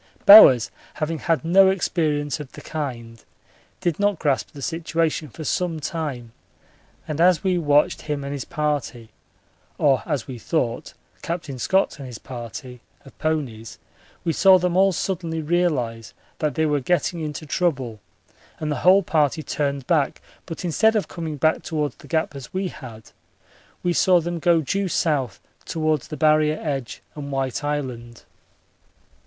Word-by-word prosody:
Bowers, 135 - +9 0.2
having 155 +1 -2
had 165 -1 0
no 190 +3 +6
experience 155 -5 -1
of 145 -3 -9
the - - -10
kind, 120 -7 -6 0.6
did 175 -1 -1
not 205 -2 +2
grasp 145 -4 0
the 140 - -11
situation 165 -1 -1
for 155 - -9
some 165 +1 -1
time, 140 -7 -4 0.8
and 155 +1 -2
as 175 -2 +4
we 185 -2 +1
watched 145 -2 +2
him 150 -2 -4
and 140 +1 -4
his 140 -3 -4
party 145 -7 -3 0.7
or 140 -3 +3
as 150 -7 -2
we 125 -3 -8
thought 120 -3 -2 0.3
Captain 160 -6 -5
Scott 190 +4 +1
and 135 - -7
his 120 -3 -8
party 125 0 -9 0.2
of 135 - -15
ponies 130 -8 -3 0.5
we 165 -2 0
saw 190 +2 +6
them 180 -1 -1
all 195 +1 +5
suddenly 170 -2 -3
realise 150 -9 -1 0.2
that 150 -2 -1
they 160 -1 +1
were 150 -1 +1
getting 175 +4 0
into 155 -1 -5
trouble 135 -9 -1 0.6
and 155 -1 -2
the 145 - -1
whole 190 +2 +6
party 155 -2 +1
turned 140 -3 -2
back; 155 -5 +1 0.3
but 170 +1 -6
instead 220 +7 +3
of 210 - 0
coming 160 -3 -5
back 155 +3 +2
towards 150 -3 -3
the - - -15
Gap 160 -3 -1
as 135 -2 -9
we 190 0 -2
had, 110 -7 -11 0.7
we 175 - +1
saw 180 0 +4
them 170 +1 -4
go 170 0 +3
due 195 +7 -1
south 145 - 0 0.2
towards 155 -3 -1
the 155 - -7
Barrier 155 0 +3
edge 135 -10 -4
and 140 -1 -7
White 135 0 -2
Island. 125 -5 -4
155 Hz, 160 wpm, -23 LUFS, 135-170 Hz, 0.8 s, Bowers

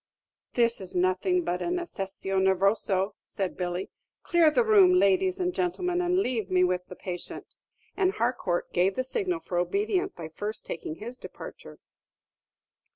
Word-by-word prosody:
"This 235 -3 +2
is 185 -1 -7
nothing 185 - +2
but 180 - -2
an 350 - 0
accessio 195 - -3
nervosa," 195 +1 +2
said 190 -2 -4
Billy; 180 +1 -3 0.3
"clear 340 -3 +5
the 385 +11 +3
room, 390 -4 +6
ladies 375 +1 +3
and 360 0 0
gentlemen, 360 0 0
and 355 +1 +1
lave 240 - 0
me 180 0 +4
with 180 0 +1
the 180 - -9
patient." 180 -1 -7 0.4
And 380 -1 +2
Harcourt 225 -7 -1
gave 185 +2 +2
the 255 - 0
signal 360 - -2
for 175 - -2
obedience 395 - 0
by 165 -2 -8
first 210 +6 -5
taking 155 -1 -5
his 240 +7 -8
departure. - - -10
225 Hz, 155 wpm, -28 LUFS, -, 0.4 s, room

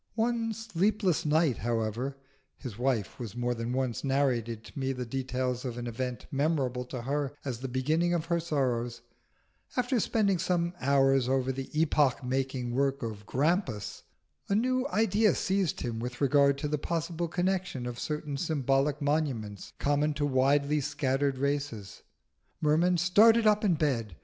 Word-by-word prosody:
One 230 0 0
sleepless 205 -5 0
night, 150 -4 +3
however 115 +4 -2 0.4
(his 120 -6 -7
wife 120 -3 0
has 115 -3 -6
more 120 0 0
than 115 0 -4
once 130 -2 -1
narrated 125 -5 0
to - - -9
me 135 0 -1
the 125 -1 -4
details 125 0 -2
of 125 -3 -4
an 120 - -4
event 125 +1 -4
memorable 135 -4 0
to 125 -1 -6
her 140 +1 -1
as 125 -4 -3
the 135 - -4
beginning 155 +7 +1
of 165 -1 -2 0.2
sorrows), 125 -7 -1 0.8
after 250 0 +1
spending 200 -4 +1
some 175 -1 0
hours 135 -1 +3
over 130 0 +1
the 130 0 -5
epoch 145 -4 +2
making 130 -1 -2
work 135 +1 0
of 105 -3 -6
Grampus, 145 - -1 0.5
a 200 - +2
new 255 +4 +1
idea 215 - +2
seized 190 -4 0
him 115 -2 -3
with 125 +1 -5
regard 140 0 +4
to 150 - -2
the 150 0 -1
possible 170 +2 -2
connection 180 -6 -1
of 120 -1 -5
certain 150 -2 -3
symbolic 140 -1 0
monuments 135 -10 -2
common 145 +1 +1
to 145 0 0
widely 140 +2 +2
scattered 135 -1 0
races. 140 -8 -3 0.6
Merman 165 +4 +3
started 220 +7 +5
up 210 0 +4
in 190 -5 +3
bed. 120 - -1
140 Hz, 155 wpm, -29 LUFS, 125-165 Hz, 0.8 s, started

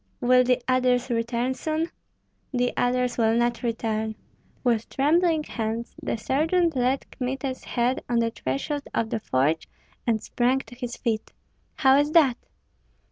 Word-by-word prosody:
"Will 250 0 +5
the 250 0 +2
others 255 -1 +2
return 235 +2 0
soon?" 315 +4 -2 0.6
"The 245 -2 0
others 250 0 +1
will 225 0 +3
not 240 0 +1
return." 220 -2 -2 0.5
With 235 -3 +1
trembling 320 +3 +2
hands 230 -2 -4
the - - -2
sergeant 320 +7 +1
laid 255 +2 +1
Kmita's 260 +1 -3
head 245 +1 0
on 240 - +1
the 230 0 +2
threshold 225 - -3
of 225 -1 0
the 225 - 0
forge, 150 -2 0 0.4
and 225 -2 +2
sprang 245 +4 +1
to 235 - -14
his 245 -1 -6
feet. 225 -3 -2 0.4
"How 270 -2 +5
is 295 +1 +1
that?" 275 -7 +5
245 Hz, 145 wpm, -25 LUFS, 230-265 Hz, 0.6 s, Will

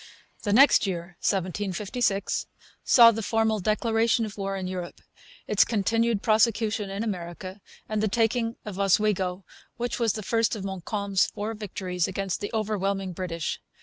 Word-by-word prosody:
The 205 - -1
next 255 -1 +6
year, 175 -1 -4
1756, 195 +3 -1 0.4
saw 235 -2 +8
the 225 0 -3
formal 220 0 +1
declaration 225 +3 +1
of 215 - -8
war 195 -1 -3
in 190 - -4
Europe, 185 -1 -5 0.5
its - - +4
continued 225 0 0
prosecution 220 -1 +2
in 200 +3 -3
America, 185 -1 -5 0.3
and 215 -1 -1
the 215 - +2
taking 230 +2 +1
of 200 -2 -6
Oswego, 195 -2 +1 0.3
which 240 0 -3
was 230 -4 +2
the 215 - -5
first 230 +3 +1
of 200 -2 -6
Montcalm's 195 +1 -1
four 215 +1 -4
victories 185 -4 -3
against 190 -1 -3
the 205 - -3
overwhelming 200 -3 -1
British. 170 -3 -4
205 Hz, 150 wpm, -26 LUFS, 190-225 Hz, 0.5 s, saw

